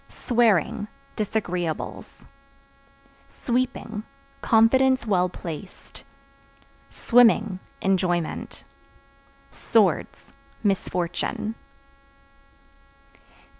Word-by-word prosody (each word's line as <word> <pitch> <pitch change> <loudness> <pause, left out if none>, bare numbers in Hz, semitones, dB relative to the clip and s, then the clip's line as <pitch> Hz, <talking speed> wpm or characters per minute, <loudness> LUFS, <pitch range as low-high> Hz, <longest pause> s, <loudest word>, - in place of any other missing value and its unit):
Swearing 220 -4 +1 0.3
Disagreeables. 180 -6 -3 1.1
Sweeping 245 -3 -2 0.4
Confidence 260 +3 +4
well 185 -4 +2
placed. 175 +1 -9 0.9
Swimming 220 -5 +3 0.2
Enjoyment. 180 -3 -1 0.9
Swords - - 0 0.3
Misfortune. 190 +1 -1
210 Hz, 45 wpm, -24 LUFS, 180-230 Hz, 1.1 s, Confidence